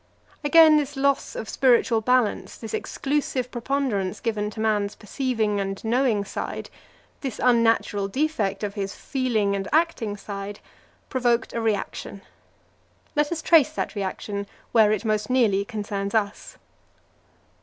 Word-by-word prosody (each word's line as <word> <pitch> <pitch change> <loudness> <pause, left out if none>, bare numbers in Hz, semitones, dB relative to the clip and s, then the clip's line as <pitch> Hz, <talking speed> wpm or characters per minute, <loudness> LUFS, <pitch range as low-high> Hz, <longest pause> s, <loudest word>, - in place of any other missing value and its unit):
Again 310 +1 +7
this 290 -1 -2
loss 280 0 +1
of 220 - -5
spiritual 240 -3 +3
balance, 250 -1 +1
this 225 - -8
exclusive 270 -3 -2
preponderance 240 -6 -1
given 210 -2 -1
to 215 - -10
man's 210 -2 0
perceiving 220 -2 -1
and 195 0 -2
knowing 230 -3 +1
side, - - -5 0.5
this 265 -5 -5
unnatural 230 -4 +3
defect 215 -6 -1
of 205 -1 -2
his 200 -2 -4
feeling 225 -7 0
and 195 0 -3
acting 290 -10 +1
side, 200 0 -6 0.5
provoked 240 -3 0
a 230 - -2
reaction. 205 -2 -3 0.9
Let 295 +1 +1
us 320 -2 -3
trace 315 -2 +5
that - - -3
reaction 200 0 -4 0.2
where 220 -3 +5
it 215 +1 -1
most 215 +1 0
nearly 225 -6 +3
concerns 205 -2 -4
us. 205 -2 -2
225 Hz, 135 wpm, -24 LUFS, 205-260 Hz, 0.9 s, Again